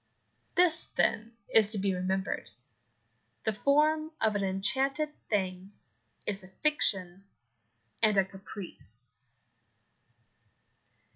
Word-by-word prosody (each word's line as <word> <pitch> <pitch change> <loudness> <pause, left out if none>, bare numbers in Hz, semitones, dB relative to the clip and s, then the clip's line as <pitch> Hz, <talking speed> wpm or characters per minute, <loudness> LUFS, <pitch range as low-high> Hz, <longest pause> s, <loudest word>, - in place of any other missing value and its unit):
This, 340 -3 +5
then, 230 0 0
is 215 -2 +5
to 215 - +1
be 195 0 0
remembered 185 +1 -2 0.9
the 220 - 0
form 305 +6 +2
of 215 -1 +2
an 200 - 0
enchanted 265 +11 0 0.2
thing 190 -1 -2 0.5
is 205 -1 -2
a - - -12
fiction 190 - 0 0.8
and 215 -2 +5
a 195 - +5
caprice. 180 - -8
205 Hz, 95 wpm, -30 LUFS, 190-265 Hz, 0.9 s, This